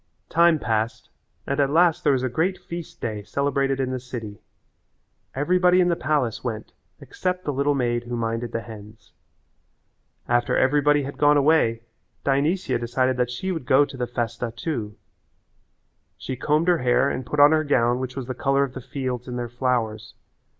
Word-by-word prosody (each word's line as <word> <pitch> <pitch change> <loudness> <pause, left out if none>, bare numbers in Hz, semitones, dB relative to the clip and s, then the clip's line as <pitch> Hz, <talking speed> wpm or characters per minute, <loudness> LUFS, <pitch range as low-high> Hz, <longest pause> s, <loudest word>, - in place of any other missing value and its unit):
Time 170 -1 +4
passed 110 -4 -2 0.4
and 140 +1 -2
at 140 -1 +3
last 170 +2 +3
there 145 - +4
was 130 -1 0
a - - +1
great 165 +9 0
feast 170 -1 -8
day 110 -2 -4
celebrated 135 +3 -1
in 130 -1 -1
the 130 - -2
city. 120 -5 -8 0.9
Everybody 180 +5 +3
in 180 -1 +3
the 170 - +2
palace 130 -7 -1
went 110 -3 -5 0.3
except 185 0 -4
the 145 - -1
little 140 +2 +1
maid 120 -2 -1
who 120 0 -4
minded 115 0 -2
the 115 - -3
hens. 105 -1 -13 1.1
After 120 0 +1
everybody 145 +2 +3
had 140 +1 -7
gone 145 0 +5
away 140 -6 +3 0.4
Dionysia 140 +1 +1
decided 130 +2 0
that 125 -1 +1
she 185 +10 -3
would 160 -8 -5
go 140 +2 +5
to 140 - -11
the 125 -1 -3
festa 120 -1 -3
too. 115 -7 -4 1.2
She 130 - -5
combed 150 +6 +1
her 175 -2 +3
hair 125 +2 +2
and 130 - -2
put 145 +4 -4
on 145 +1 +8
her 155 0 +3
gown 120 -4 +2
which 130 0 -5
was 135 -2 -4
the 130 - -4
colour 135 +2 +1
of 135 -2 -4
the 130 - -7
fields 125 -1 -4
and 125 - -5
all 120 -1 -3
their - - -9
flowers. 115 -3 -2
130 Hz, 185 wpm, -24 LUFS, 120-145 Hz, 1.2 s, on